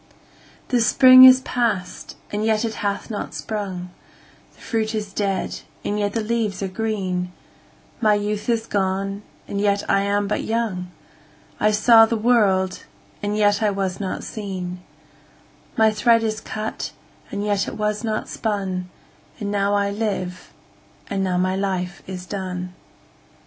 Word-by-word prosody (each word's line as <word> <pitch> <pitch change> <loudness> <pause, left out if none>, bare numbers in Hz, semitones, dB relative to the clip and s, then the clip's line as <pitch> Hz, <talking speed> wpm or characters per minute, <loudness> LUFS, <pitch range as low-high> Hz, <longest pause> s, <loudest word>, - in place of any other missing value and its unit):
7The 245 -2 +2
spring 255 +3 +9
is 260 0 +8
past, 230 -8 -2 0.2
and 210 +1 -2
yet 220 0 +2
it 225 - -2
hath 200 +2 -2
not 205 -6 -5
sprung,8The 180 +1 -8
fruit 220 -1 -2
is 205 -2 -4
dead, 195 -2 -2 0.3
and 205 +1 -1
yet 205 -1 -1
the 225 - -1
leaves 215 -3 -1
are - - 0
green,9My 195 +1 -3
youth 210 +2 -3
is 230 -1 +1
gone, 195 0 -1 0.3
and 200 - -2
yet 200 -1 +1
I 195 - +3
am 200 0 0
but 210 - -1
young,10I 215 -1 -4
saw 225 +1 +7
the 230 - -1
world, 205 -5 +2 0.4
and 205 +1 -1
yet 205 0 +3
I 215 - +3
was 195 -2 -2
not 195 -2 -3
seen,11My 190 +2 -4
thread 230 +1 +4
is 215 0 -2
cut, 215 0 -5 0.4
and 200 +1 -3
yet 205 -1 0
it - - -6
was 210 +1 -1
not 220 -1 -2
spun,12And 195 0 -5
now 200 0 +1
I 200 0 +1
live, 200 -4 -3 0.6
and 195 -1 0
now 185 -1 0
my 185 +1 +1
life 185 -2 -2
is 180 -1 -6
done. 180 -2 -5
205 Hz, 140 wpm, -22 LUFS, 190-220 Hz, 0.6 s, spring